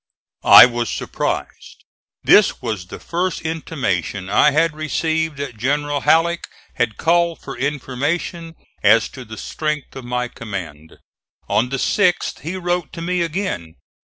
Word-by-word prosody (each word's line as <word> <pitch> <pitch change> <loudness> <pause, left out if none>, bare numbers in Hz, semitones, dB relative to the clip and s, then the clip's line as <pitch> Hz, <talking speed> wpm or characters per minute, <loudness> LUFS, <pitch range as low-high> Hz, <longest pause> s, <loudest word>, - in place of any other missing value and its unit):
I - - +10
was 120 -2 -2
surprised. - - -4 0.4
This 205 - +5
was 110 -7 -4
the - - -8
first 175 +1 -2
intimation 105 - -3
I 150 - +5
had 155 +2 +2
received 160 0 -1
that 140 -5 -6
General 145 +4 -1
Halleck 170 +3 +2 0.3
had 120 -4 -1
called 170 0 +2
for 135 - -7
information 150 +5 -3 0.3
as 115 0 +5
to 130 - -10
the 110 -1 -10
strength 150 -3 -4
of 135 - -7
my 125 0 -2
command. 95 -10 -8 0.5
On 125 +3 +1
the 135 - -2
6th 180 +5 +1
he 165 +7 -5
wrote 175 -2 -2
to 165 - -7
me 180 0 0
again. 165 - -3
145 Hz, 140 wpm, -20 LUFS, 120-165 Hz, 0.5 s, I